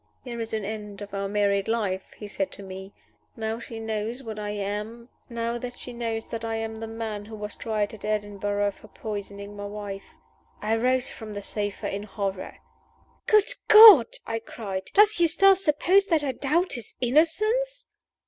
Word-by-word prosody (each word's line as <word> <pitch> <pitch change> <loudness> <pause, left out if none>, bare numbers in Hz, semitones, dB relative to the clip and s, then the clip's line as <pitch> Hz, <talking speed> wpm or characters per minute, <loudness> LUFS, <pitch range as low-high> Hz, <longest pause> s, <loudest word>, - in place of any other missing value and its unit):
'There 240 -3 -6
is 225 0 -4
an 215 -2 -2
end 210 -1 -6
of 205 -1 -9
our 195 0 -2
married 200 -1 +1
life,' 205 -5 -1
he 210 - -7
said 195 -1 -2
to 200 - -10
me, 190 0 -8 0.4
'now 225 0 -3
she 230 -1 -8
knows 220 +1 -3
that 220 -4 -7
I 210 0 -4
am 210 +3 -4 0.2
the 230 -1 -4
man 220 -2 -5
who 220 +1 -9
was 210 -1 -6
tried 215 -2 -2
at 220 - -11
Edinburgh 205 -1 -1
for 215 - -17
poisoning 200 -1 -7
my 205 0 -6
wife!"' 200 -1 -7 0.4
I 215 +2 0
rose 255 +2 +1
from 220 -2 -8
the 205 - -5
sofa 205 -1 -3
in 200 - -3
horror. 195 -2 -4 0.7
"Good 425 +2 +4 0.2
God!" 425 - +11 0.2
I 225 0 -2
cried, 195 -4 -6
"does 420 -1 +6
Eustace 380 +3 +5
suppose 360 +7 +4
that 325 -6 +2
I 275 - 0
doubt 315 +8 0
his 240 -5 -5
innocence?" 430 - +2
220 Hz, 160 wpm, -26 LUFS, 205-245 Hz, 0.7 s, God